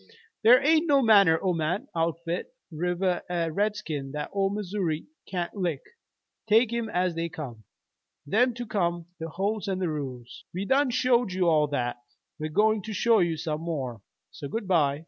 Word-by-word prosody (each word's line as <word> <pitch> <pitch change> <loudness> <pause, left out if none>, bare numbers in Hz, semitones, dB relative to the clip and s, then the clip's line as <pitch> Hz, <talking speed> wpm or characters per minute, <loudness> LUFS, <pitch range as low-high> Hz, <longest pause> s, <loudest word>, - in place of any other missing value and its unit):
Thar 245 +4 +7
hain't 315 +3 +3
no 280 -3 +4
manner 200 -8 +6
o' 185 -2 +2
man, 165 +4 -1
outfit, 165 +1 -1 0.2
river 175 +2 0
er 170 -2 -1
redskin 160 -9 -2
that 150 - -4
Ole 195 -1 +1
Missoury 195 -6 -2 0.2
kain't 175 -2 -3
lick, 175 -8 -2 0.7
take 225 +2 +4
'em 235 -1 -2
as 180 -2 0
they 165 +1 -2
come, 130 - -8 0.6
them 230 - +2
to 240 0 -5
name 175 -5 -1
the 165 0 -5
holts 200 +5 -2
an' 190 -1 -1
the 185 -2 -1
rules. 130 -6 -6
We 190 +2 -2
done 270 +3 +3
showed 245 -4 +2
you 180 -1 +1
all 155 -2 +4
that. 125 -5 -2 0.4
We're 155 0 -3
goin' 215 +6 +2
to 215 +3 -6
show 225 +2 +3
you 170 -3 +1
some 155 0 -3
more. 135 -10 -4 0.3
So 140 - -7
good 210 +6 -4
by." 150 -6 +2
180 Hz, 175 wpm, -27 LUFS, 155-210 Hz, 0.7 s, Thar